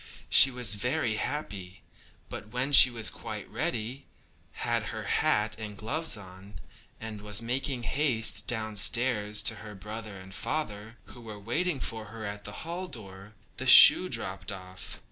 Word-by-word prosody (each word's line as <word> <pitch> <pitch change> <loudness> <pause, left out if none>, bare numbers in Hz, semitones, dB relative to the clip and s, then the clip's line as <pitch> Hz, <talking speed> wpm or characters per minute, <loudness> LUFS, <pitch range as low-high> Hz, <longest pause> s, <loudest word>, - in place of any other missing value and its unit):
She 135 - +9
was 125 -5 +2
very 120 +1 -2
happy; 100 -9 -6 0.4
but - - -9
when 125 +5 -4
she 130 -2 +9
was 115 -3 -2
quite 110 -3 -8
ready, 125 0 -4 0.6
had - - -1
her - - -6
hat 105 +1 0
and 105 -2 -8
gloves 140 +6 -2
on, 95 +1 -14 0.4
and 110 -2 -8
was 105 0 +1
making 125 +1 -3
haste 115 -7 0
downstairs 110 -1 +1
to - - +2
her 105 -1 -11
brother 105 +1 -9
and 95 0 -13
father, 110 -4 -5
who 120 - -15
were 110 -2 -10
waiting 140 - -3
for 110 -3 -5
her 110 +1 -9
at 100 0 -7
the - - -7
hall 175 +3 -5
door, 100 - -11 0.2
the - - -5
shoe - - +9
dropped 95 +1 -2
off. 95 -1 -10
110 Hz, 155 wpm, -28 LUFS, 100-125 Hz, 0.6 s, She